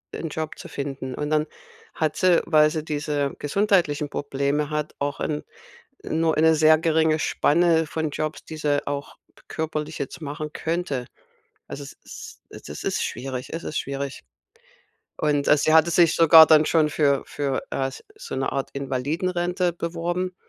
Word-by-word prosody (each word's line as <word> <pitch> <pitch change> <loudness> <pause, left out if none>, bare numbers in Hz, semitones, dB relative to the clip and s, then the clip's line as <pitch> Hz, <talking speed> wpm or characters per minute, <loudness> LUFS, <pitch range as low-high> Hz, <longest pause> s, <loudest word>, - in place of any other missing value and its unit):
'n 165 - -4
Job 155 0 -5
zu - - -9
finden. 135 -2 -5
Und 150 0 -3
dann 155 0 +2 0.5
hat 155 -2 -1
sie, 180 -2 +4
weil 155 -2 +5
sie 155 -2 -3
diese 145 -2 -2
gesundheitlichen 155 -3 +1
Probleme 145 +1 -1
hat, 150 0 -3
auch 145 0 -2
'n 150 -1 -2 0.6
nur 160 0 0
eine 160 +1 +5
sehr 155 0 +5
geringe 160 -1 +2
Spanne 165 0 +2
von 155 0 -3
Jobs, 155 +1 -4
die 160 - -8
sie 145 -2 0
auch 140 0 -5 0.3
körperlich 155 -1 -4
jetzt 140 +5 -5
machen 150 +1 -6
könnte. 160 -7 -3 0.6
Also, 140 - -7
es 140 - -11
es - - -9
ist - - -1
schwierig 130 0 -5
es 165 - -5
ist 155 - -4
schwierig. 140 0 -5 1.0
Und, 145 -2 +1
äh, 150 - +6
sie 155 +2 +2
hatte 160 +1 +5
sich 170 -1 +4
sogar 165 -1 +9
dann 155 -1 +6
schon 155 -2 +3
für 140 -2 +2
für, 140 -2 -2
äh, 135 0 -1 0.3
so - - -7
'ne 135 - -1
Art 135 -1 -3
Invalidenrente 175 +7 -1
beworben, 175 +2 -3
155 Hz, 160 wpm, -24 LUFS, 145-165 Hz, 1.0 s, sogar